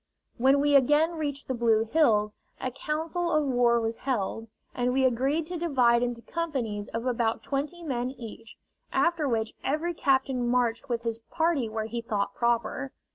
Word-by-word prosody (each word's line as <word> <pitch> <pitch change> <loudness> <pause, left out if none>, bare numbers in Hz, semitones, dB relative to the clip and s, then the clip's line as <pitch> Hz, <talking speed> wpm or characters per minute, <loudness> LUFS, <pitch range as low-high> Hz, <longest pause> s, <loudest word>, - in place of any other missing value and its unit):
When 270 +3 +5
we 290 0 +2
again 295 +5 +4
reached 290 -4 -4
the 260 - -1
Blue 230 -2 +3
Hills, 215 -6 +2 0.2
a 255 - -3
council 320 +6 -2
of 305 -1 +2
war 245 -3 +3
was 225 0 -2
held, 225 -3 -2 0.3
and 245 0 0
we 265 0 +3
agreed 270 +6 +1
to 350 +1 -5
divide 250 -8 +3
into 240 -1 -2
companies 250 -12 -3
of 230 +1 -4
about 235 -3 0
twenty 295 +5 -3
men 250 -5 -2
each, 230 -3 -10 0.4
after 340 -3 +2
which 225 -3 -1
every 315 +5 -1
captain 265 -4 +1
marched 245 +1 0
with 235 -1 -1
his 230 -1 -2
party 320 -8 +1
where 220 0 -3
he 235 +1 -4
thought 205 -3 -2
proper. 235 +4 0
250 Hz, 170 wpm, -27 LUFS, 230-295 Hz, 0.4 s, When